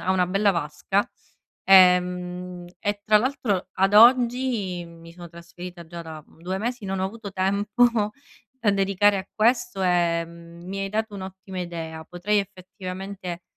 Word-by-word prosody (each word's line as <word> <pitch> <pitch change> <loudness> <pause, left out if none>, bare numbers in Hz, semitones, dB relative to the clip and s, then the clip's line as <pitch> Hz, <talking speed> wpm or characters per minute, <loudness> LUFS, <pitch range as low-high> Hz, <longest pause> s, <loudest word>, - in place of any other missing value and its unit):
ha 185 - -1
una 180 -1 +2
bella 200 +3 +2
vasca, 170 +4 -1 0.6
ehm, 180 -1 +3
e 205 0 -2
tra 215 0 +6
l'altro 225 -7 -1
ad 195 +2 +1
oggi 235 -5 +4
mi 165 0 -14
sono 175 -1 -10
trasferita 170 0 -10
già 170 0 -8
da 160 -2 -9
2 180 +3 -5
mesi, 240 +1 -3
non 195 -1 -3
ho 190 - 0
avuto 210 -1 -8
tempo 200 +5 +1 0.7
da 225 -5 +2
dedicare 200 +1 +2
a 190 - -7
questo, 230 -2 +1
ehm, 170 -1 -1
mi 195 +2 -5
hai 195 - -2
dato 215 +1 -2
un'ottima 190 -1 -7
idea. 165 -2 -6
Potrei 185 +5 -1
effettivamente 185 -1 -7
190 Hz, 145 wpm, -24 LUFS, 175-205 Hz, 0.7 s, tra